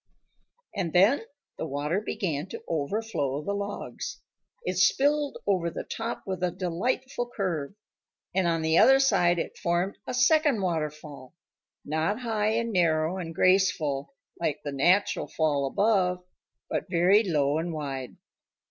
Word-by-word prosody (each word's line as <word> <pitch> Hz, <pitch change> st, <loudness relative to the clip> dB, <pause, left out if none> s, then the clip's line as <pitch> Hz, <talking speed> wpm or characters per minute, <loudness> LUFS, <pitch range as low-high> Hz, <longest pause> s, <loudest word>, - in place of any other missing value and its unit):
And 175 Hz, -5 st, -2 dB
then 200 Hz, +10 st, +5 dB, 0.4 s
the -, -, -3 dB
water 150 Hz, +7 st, -1 dB
began 170 Hz, -7 st, -3 dB
to -, -, -8 dB
overflow 150 Hz, -3 st, -2 dB
the 200 Hz, -, -2 dB
logs. 200 Hz, -11 st, -5 dB, 0.4 s
It 180 Hz, 0 st, -2 dB
spilled 285 Hz, +10 st, +2 dB
over 185 Hz, -4 st, +1 dB
the -, -, -5 dB
top 225 Hz, +1 st, -5 dB
with 185 Hz, -2 st, -4 dB
a 180 Hz, -, +2 dB
delightful 240 Hz, +8 st, -2 dB
curve. 180 Hz, -8 st, -3 dB, 0.6 s
And 185 Hz, -1 st, +2 dB
on 165 Hz, -1 st, 0 dB
the 160 Hz, +1 st, +3 dB
other 270 Hz, 0 st, +7 dB
side 175 Hz, -10 st, +3 dB
it 165 Hz, -, -4 dB
formed 175 Hz, +3 st, -1 dB
a 255 Hz, -, -3 dB
second 290 Hz, 0 st, +4 dB
waterfall 150 Hz, -6 st, -4 dB, 0.5 s
not 160 Hz, -, -1 dB
high 220 Hz, -2 st, 0 dB
and 230 Hz, 0 st, -1 dB
narrow 165 Hz, 0 st, +2 dB
and 165 Hz, -2 st, -6 dB
graceful 185 Hz, -, +2 dB, 0.2 s
like 150 Hz, -3 st, -1 dB
the 145 Hz, -, -4 dB
natural 175 Hz, +9 st, +2 dB
fall 145 Hz, -3 st, 0 dB
above, 180 Hz, +1 st, +1 dB, 0.4 s
but -, -, -3 dB
very 180 Hz, +4 st, +4 dB
low 150 Hz, -7 st, +1 dB
and 170 Hz, +1 st, -3 dB
wide. 135 Hz, -5 st, -5 dB
180 Hz, 140 wpm, -27 LUFS, 155-205 Hz, 0.6 s, other